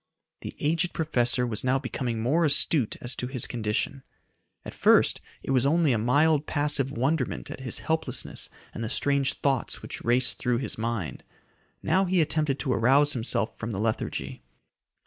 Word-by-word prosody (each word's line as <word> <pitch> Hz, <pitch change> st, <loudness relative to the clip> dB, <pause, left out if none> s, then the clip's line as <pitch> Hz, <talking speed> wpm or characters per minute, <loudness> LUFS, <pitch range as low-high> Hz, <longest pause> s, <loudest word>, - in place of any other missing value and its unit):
The -, -, -8 dB
aged 165 Hz, +3 st, 0 dB
professor 125 Hz, -6 st, +1 dB
was 110 Hz, -3 st, -1 dB
now 130 Hz, +1 st, +2 dB
becoming 125 Hz, -3 st, -4 dB
more 150 Hz, +9 st, +1 dB
astute 145 Hz, -4 st, +4 dB
as 120 Hz, +1 st, 0 dB
to 125 Hz, -, -3 dB
his 125 Hz, -2 st, 0 dB
condition. 115 Hz, +4 st, -3 dB, 0.6 s
At -, -, -8 dB
first -, -, +3 dB, 0.2 s
it -, -, -4 dB
was 130 Hz, -2 st, +2 dB
only 155 Hz, +1 st, +2 dB
a 115 Hz, -, 0 dB
mild, 145 Hz, +6 st, +2 dB
passive 145 Hz, -2 st, +1 dB
wonderment 135 Hz, +2 st, -2 dB
at -, -, -8 dB
his 130 Hz, -2 st, -1 dB
helplessness 160 Hz, 0 st, -1 dB, 0.2 s
and 115 Hz, -, -6 dB
the 110 Hz, -, -3 dB
strange 140 Hz, +1 st, +1 dB
thoughts 135 Hz, -4 st, -1 dB
which -, -, -6 dB
raced 125 Hz, +2 st, +3 dB
through 125 Hz, -1 st, 0 dB
his 135 Hz, -, +1 dB
mind. 110 Hz, -6 st, -4 dB, 0.6 s
Now 185 Hz, +5 st, +2 dB
he 185 Hz, 0 st, +1 dB
attempted 150 Hz, -3 st, 0 dB
to 130 Hz, -3 st, -1 dB
arouse 140 Hz, +6 st, +3 dB
himself 110 Hz, -3 st, 0 dB
from 115 Hz, -, -5 dB
the 105 Hz, -, -4 dB
lethargy. 65 Hz, -, -3 dB
130 Hz, 165 wpm, -26 LUFS, 120-150 Hz, 0.6 s, astute